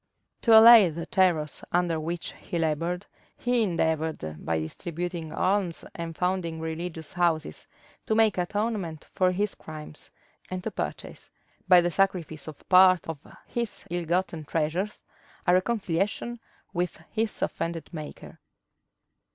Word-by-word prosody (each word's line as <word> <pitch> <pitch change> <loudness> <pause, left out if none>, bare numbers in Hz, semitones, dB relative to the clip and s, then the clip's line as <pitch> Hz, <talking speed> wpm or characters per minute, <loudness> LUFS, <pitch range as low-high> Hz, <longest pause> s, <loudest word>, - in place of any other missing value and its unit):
To 225 -2 +7
allay 225 -4 +10
the 165 +1 -5
terrors 170 -5 +1
under 175 -2 +1
which 170 +2 -4
he 175 - -6
labored, 165 +3 -1 0.3
he 245 -1 +1
endeavored, 160 - -1
by 80 -1 0
distributing 170 - -5
alms 185 -3 0
and 165 -1 -6
founding 180 -3 -1
religious 160 0 -5
houses, 170 -3 0 0.4
to 220 - +2
make 220 -3 +4
atonement 195 -4 -2
for 185 -1 +3
his 200 +2 -1
crimes, 155 -1 -9 0.4
and 185 -1 -4
to - - -3
purchase, - - -6 0.4
by 180 -1 +8
the 175 0 0
sacrifice 170 -6 0
of 155 - -10
part 185 -1 +6
of 165 -3 -5 0.3
his 235 -2 -4
ill 175 -1 -2
gotten 170 -1 -1
treasures, 165 +7 -2 0.4
a 180 - +4
reconciliation 205 +3 0 0.3
with 175 -2 -2
his 225 -1 -1
offended 165 -1 -3
Maker. 155 -2 -8
175 Hz, 130 wpm, -27 LUFS, 160-190 Hz, 0.4 s, allay